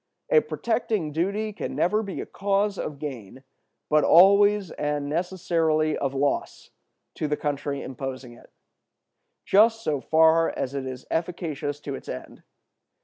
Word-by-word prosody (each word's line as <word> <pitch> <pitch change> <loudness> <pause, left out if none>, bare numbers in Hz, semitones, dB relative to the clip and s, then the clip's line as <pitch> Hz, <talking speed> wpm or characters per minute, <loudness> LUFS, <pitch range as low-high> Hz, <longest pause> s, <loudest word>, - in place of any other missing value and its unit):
A 485 - +7
protecting 220 - -2
duty 200 +7 -1
can - - -5
never 210 +5 +2
be 200 -3 -5
a - - -6
cause 200 0 -1
of 145 - -4
gain, 130 -4 -8 0.4
but 155 0 +3
always 200 +2 +5
and 145 -1 -2
necessarily 160 -2 0
of 140 -1 -2
loss, 140 +1 -2 0.4
to 155 - -3
the 150 0 -1
country 145 -1 -3
imposing 130 -1 -6
it, - - -18 1.0
just 225 +3 +4
so 150 -2 0
far 160 +2 +4
as 130 - -3
it 135 -1 -4
is 130 -1 -7
efficacious 160 -4 -3
to 140 - -5
its - - -8
end. - - -8
160 Hz, 145 wpm, -25 LUFS, 140-195 Hz, 1.0 s, A